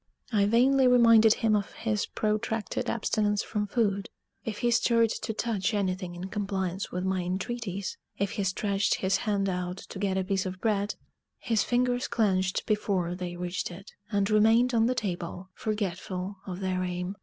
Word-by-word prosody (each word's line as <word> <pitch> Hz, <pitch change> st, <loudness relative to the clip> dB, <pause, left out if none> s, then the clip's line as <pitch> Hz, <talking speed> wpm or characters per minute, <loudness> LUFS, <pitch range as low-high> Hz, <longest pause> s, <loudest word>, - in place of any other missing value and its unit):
I 205 Hz, -3 st, +3 dB
vainly 260 Hz, +4 st, +4 dB
reminded 230 Hz, -3 st, +6 dB
him 220 Hz, -2 st, +2 dB
of 205 Hz, -1 st, -2 dB
his 215 Hz, -3 st, -1 dB
protracted 215 Hz, -1 st, -1 dB
abstinence 210 Hz, -2 st, 0 dB
from 210 Hz, -2 st, -2 dB
food. 200 Hz, -3 st, 0 dB, 0.3 s
If 215 Hz, -2 st, -4 dB
he 240 Hz, -, +4 dB
stirred 230 Hz, -1 st, +3 dB
to -, -, -2 dB
touch 215 Hz, -1 st, -1 dB
anything 185 Hz, -3 st, -2 dB
in 180 Hz, +2 st, -5 dB
compliance 195 Hz, -2 st, -2 dB
with 180 Hz, +1 st, -2 dB
my 190 Hz, -1 st, 0 dB
entreaties 190 Hz, +2 st, -3 dB, 0.2 s
if 200 Hz, -1 st, -1 dB
he 210 Hz, -3 st, -2 dB
stretched 195 Hz, +1 st, +1 dB
his 190 Hz, +1 st, +1 dB
hand 200 Hz, -2 st, 0 dB
out 180 Hz, -1 st, -2 dB
to 190 Hz, -, -9 dB
get 190 Hz, -1 st, 0 dB
a 190 Hz, -, +1 dB
piece 190 Hz, 0 st, -1 dB
of 185 Hz, 0 st, -6 dB
bread 205 Hz, -2 st, 0 dB, 0.4 s
his 225 Hz, -3 st, +1 dB
fingers 245 Hz, 0 st, +1 dB
clenched 190 Hz, -4 st, +1 dB
before 195 Hz, -5 st, 0 dB
they 180 Hz, -1 st, -5 dB
reached 180 Hz, +1 st, -3 dB
it, 190 Hz, +4 st, -11 dB, 0.2 s
and 200 Hz, -1 st, +2 dB
remained 225 Hz, +4 st, +4 dB
on 225 Hz, -1 st, +4 dB
the 255 Hz, -, +1 dB
table, 180 Hz, -3 st, -4 dB
forgetful 195 Hz, -2 st, -3 dB
of 185 Hz, 0 st, -5 dB
their 185 Hz, -1 st, -1 dB
aim. 180 Hz, +1 st, -3 dB
200 Hz, 170 wpm, -28 LUFS, 185-220 Hz, 0.4 s, reminded